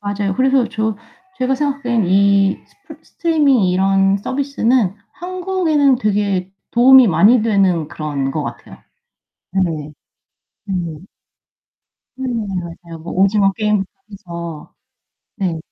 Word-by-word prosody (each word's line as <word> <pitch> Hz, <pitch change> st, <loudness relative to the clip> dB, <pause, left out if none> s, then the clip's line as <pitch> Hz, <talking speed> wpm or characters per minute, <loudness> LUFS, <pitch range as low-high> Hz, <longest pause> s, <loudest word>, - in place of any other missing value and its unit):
맞아요 205 Hz, -1 st, -2 dB
그래서 265 Hz, -1 st, +2 dB
저 220 Hz, -1 st, -2 dB, 0.4 s
제가 255 Hz, +1 st, +1 dB
생각하기에는 265 Hz, -6 st, -1 dB
이 195 Hz, +1 st, +3 dB
스프 315 Hz, -7 st, -16 dB
스트리밍 295 Hz, -, +1 dB
이런 195 Hz, +1 st, +2 dB
서비스는 255 Hz, -4 st, 0 dB, 0.2 s
한국에는 355 Hz, -6 st, 0 dB
되게 200 Hz, -5 st, -1 dB, 0.2 s
도움이 255 Hz, 0 st, +6 dB
많이 205 Hz, +8 st, +4 dB
되는 190 Hz, -8 st, +1 dB
그런 150 Hz, -5 st, -3 dB
것 150 Hz, +2 st, -3 dB
같아요. -, -, -9 dB, 0.7 s
네. 165 Hz, -6 st, -2 dB, 0.7 s
네. 175 Hz, -6 st, -4 dB, 1.2 s
네. 265 Hz, -, -4 dB
맞아요. 175 Hz, -6 st, -6 dB
뭐 170 Hz, -, -7 dB
오징어 195 Hz, +1 st, +2 dB
게임부터 210 Hz, -1 st, 0 dB, 0.2 s
해서. 170 Hz, -5 st, -9 dB, 0.6 s
네. 185 Hz, -6 st, -2 dB
200 Hz, 245 characters per minute, -18 LUFS, 180-255 Hz, 1.2 s, 도움이